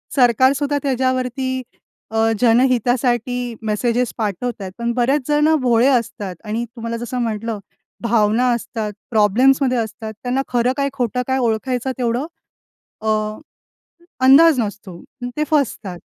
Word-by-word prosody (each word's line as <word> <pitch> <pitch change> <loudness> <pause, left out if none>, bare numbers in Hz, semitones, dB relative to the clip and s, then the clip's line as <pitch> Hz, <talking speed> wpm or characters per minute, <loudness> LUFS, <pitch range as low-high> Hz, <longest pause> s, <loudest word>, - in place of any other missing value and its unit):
सरकारसुद्धा 270 +3 +3
त्याच्यावरती 255 -1 0 0.7
अ, 225 0 +2
जनहितासाठी 245 0 +2
मेसेजेस 230 +3 0
पाठवत 220 +1 -3
आहेत. 190 -1 -5
पण 235 0 -1
बरेच 255 +4 +1
जण 300 +1 +3
भोळे 240 0 +3
असतात. 225 -7 -1
आणि 225 +2 -3
तुम्हाला 230 -1 -4
जसं 240 +2 -4
म्हटलं, 225 -1 -3 0.4
भावना 230 +1 +2
असतात, 225 -2 -4 0.2
प्रॉब्लेम्समध्ये 250 +5 +3
असतात. 220 -1 -4
त्यांना 250 +2 0
खरं 245 +1 +1
काय, 280 0 +1
खोटं 250 -2 -1
काय? 260 0 +1
ओळखायचं 245 +2 -1
तेवढं 245 +2 -1 0.8
अ, 220 - -2 1.2
अंदाज 280 +1 +7
नसतो. 205 -5 -6 0.4
ते 300 - +1
फसतात. 230 - -1
240 Hz, 120 wpm, -19 LUFS, 225-260 Hz, 1.2 s, अंदाज